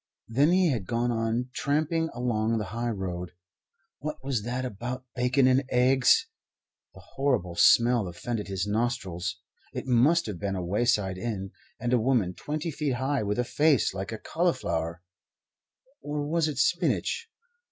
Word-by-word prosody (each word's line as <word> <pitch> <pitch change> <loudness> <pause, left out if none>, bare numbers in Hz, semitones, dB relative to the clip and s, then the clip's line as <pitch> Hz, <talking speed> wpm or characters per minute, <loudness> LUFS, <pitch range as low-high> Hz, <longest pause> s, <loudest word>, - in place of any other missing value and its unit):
Then 140 +8 +3
he 180 -3 +4
had 110 -8 -3
gone 120 +1 0
on 115 +2 -1
tramping 155 +4 0
along 115 -2 0
the 110 - -1
high 120 +1 -1
road. 90 -4 -4 0.7
What 150 +2 -4
was 135 -5 -1
that 125 +4 -3
about 125 +3 -5
bacon 125 +2 +3
and 130 +1 +4
eggs? 130 +1 +4 0.7
The - - -12 0.2
horrible 125 -11 +1
smell 120 +3 +5
offended 105 +5 -4
his 95 -2 -2
nostrils. 105 -5 -2 0.4
It - - -4
must 135 +7 +4
have 100 -6 -5
been 100 -1 -2
a 90 -2 -3
wayside 100 -1 +1
inn; 95 -3 -4 0.3
and 120 0 -1
a 125 - +4
woman 115 -7 +2
twenty 155 - -4
feet 145 -3 -1
high 135 +3 0
with 105 +1 -1
a 125 - +2
face 145 -2 +2
like 95 +1 -5
a 110 - -4
cauliflower 85 - -1 1.0
or 145 0 -3
was 165 0 +1
it 150 -4 -4
spinach? 180 - +1
120 Hz, 155 wpm, -27 LUFS, 105-140 Hz, 1.0 s, smell